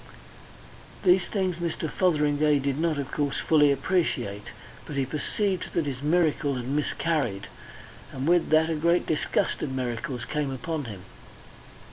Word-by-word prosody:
These 180 -1 +5
things 185 -4 -1
Mr. 170 -2 -2
Fotheringay 150 -3 +2
did 140 +1 -1
not, 165 -2 +1
of 140 -2 -4
course, 145 -2 -1
fully 150 -3 +4
appreciate. 135 - -1 0.4
But 150 - -6
he 135 -1 +1
perceived 180 +7 -2
that 165 - +1
his 135 -2 -4
miracle 150 -2 +2
had 125 -1 -4
miscarried, 145 -6 -1 0.7
and 135 +2 -4
with 175 0 +3
that 160 +1 +4
a - - 0
great 170 +3 +2
disgust 155 - 0
of 140 - -2
miracles 125 0 -3
came 150 -2 -2
upon 145 +3 -4
him. 105 -5 -8
150 Hz, 145 wpm, -26 LUFS, 135-170 Hz, 0.7 s, These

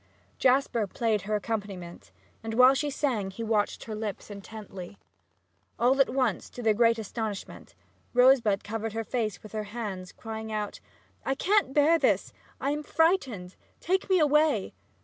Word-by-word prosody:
Jasper 255 -4 +2
played 220 +1 0
her 215 - +2
accompaniment, 200 -5 -5 0.3
and 225 0 -4
while 255 +2 +7
she 290 +2 -1
sang 250 -9 -1
he 195 +4 -6
watched 215 -2 0
her 220 - -6
lips 215 -1 -5
intently. 200 -2 -9 0.8
All 260 +3 +4
at 270 - +3
once, 260 0 0
to 245 - -8
their 220 -1 +4
great 230 +1 +4
astonishment, 220 -1 -6 0.4
Rosebud 245 -5 +5
covered 220 0 -4
her 225 0 -2
face 220 -5 -3
with 215 - -11
her 215 -1 -3
hands 205 -4 -5
and, - - -18
crying 220 0 -6
out, 210 -1 -3 0.4
"I 270 - 0
can't 385 -4 +2
bear 305 +4 +4
this! - - +1 0.3
I 275 - 0
am 295 +1 -2
frightened! 280 - +1 0.2
Take 380 +3 0
me 375 - +5
away!" 305 -1 +3
225 Hz, 160 wpm, -28 LUFS, 210-270 Hz, 0.8 s, while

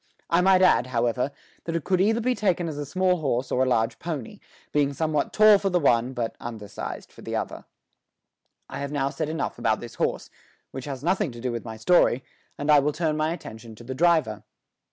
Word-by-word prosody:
I 170 +1 +4
might 185 0 +5
add, 155 -8 +4
however, 120 +2 0 0.3
that 165 - -3
it 165 - -1
could 185 -1 +1
either 220 +4 +2
be 250 +2 +1
taken 185 -7 0
as 150 -2 -5
a 145 - -4
small 185 +3 +1
horse 135 -5 -1
or 125 - +1
as 130 - +3
a - - +1
large 115 -2 +1
pony, 155 -9 -5 0.3
being 145 -1 +1
somewhat 155 +1 -1
tall 215 -1 +6
for 195 - 0
the 180 -1 +2
one, 125 -4 +2
but 120 -3 -3
undersized 110 -4 -7
for - - -15
the - - -5
other. - - -4 1.0
I - - -7
have 140 0 -4
now 140 -2 0
said 155 -1 -3
enough 160 -6 -3
about 110 -2 +1
this 120 - -9
horse, - - -1 0.4
which 130 -1 -7
has 140 -2 -6
nothing 185 -1 +1
to 120 - -10
do 125 +1 -2
with 120 0 -5
my 110 -1 -7
story, 130 0 +3 0.3
and 145 +1 +1
I 150 - +8
will 145 +2 0
turn 155 -1 0
my 155 +1 0
attention 115 -9 -8
to 120 - -13
the 130 +3 -5
driver. 160 -7 +2
145 Hz, 220 wpm, -25 LUFS, 120-175 Hz, 1.0 s, I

